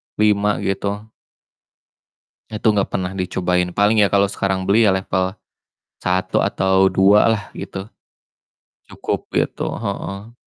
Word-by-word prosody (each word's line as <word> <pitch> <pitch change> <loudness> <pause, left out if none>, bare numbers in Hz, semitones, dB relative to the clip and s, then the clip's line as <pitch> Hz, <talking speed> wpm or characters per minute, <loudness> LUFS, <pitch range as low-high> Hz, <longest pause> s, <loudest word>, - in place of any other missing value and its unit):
5 105 -1 +2
gitu 100 +1 -2 1.5
itu 110 0 -5
gak 100 -2 0
pernah 90 0 -3
dicobain, 90 -1 -1
paling 105 +2 +3
ya 100 - +4
kalau 100 0 +3
sekarang 95 -1 -1
beli 110 +3 +4
ya - - +5
level 95 0 -2 0.6
1 90 +1 0
atau 95 0 +2
2 100 +2 +5
lah 105 -2 -2
gitu, 95 +1 -7 1.0
cukup - - -4
gitu, - - -1
heeh. 100 +5 -5
100 Hz, 120 wpm, -20 LUFS, 95-105 Hz, 1.5 s, ya